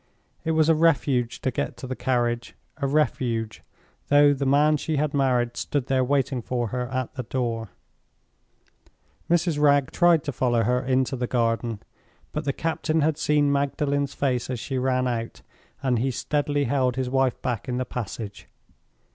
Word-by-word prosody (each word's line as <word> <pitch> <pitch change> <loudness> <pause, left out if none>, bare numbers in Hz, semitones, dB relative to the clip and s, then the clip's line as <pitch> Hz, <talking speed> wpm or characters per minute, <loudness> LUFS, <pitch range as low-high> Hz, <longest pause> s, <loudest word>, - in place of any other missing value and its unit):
It 160 - 0
was 155 -1 +3
a 165 - +6
refuge 145 -7 +1
to 130 - 0
get - - -3
to - - -7
the 130 0 -4
carriage—a 120 +3 -2
refuge, 120 -6 0 0.5
though 145 0 +6
the 140 0 -2
man 150 +3 +4
she 155 +2 -2
had 150 0 0
married 125 -4 +1
stood 145 -4 -2
there 130 -1 +1
waiting 135 -1 0
for 120 -1 -2
her 125 +1 -3
at 130 -1 -3
the 130 - -4
door. 115 -3 -3 1.6
Mrs. 170 -3 +2
Wragge 145 -2 +4
tried 175 -3 +4
to 145 - -3
follow 120 -3 +1
her 125 +3 +1
into 130 +1 +1
the 125 -1 -2
garden. 115 -2 -1 0.5
But 150 0 -4
the 140 - +1
captain 160 +1 -1
had 155 +1 +1
seen 145 -2 +2
Magdalen's 140 0 0
face 130 -4 -1
as 125 -3 -3
she 130 +2 -3
ran 130 0 +1
out, 115 -2 -4 0.4
and 125 -3 +1
he 130 +4 0
steadily 145 +2 -1
held 130 -3 +1
his 130 -1 -1
wife 135 -2 +1
back 125 +1 -2
in 125 - -1
the 130 - -1
passage. 110 -3 -6
130 Hz, 170 wpm, -25 LUFS, 125-145 Hz, 1.6 s, a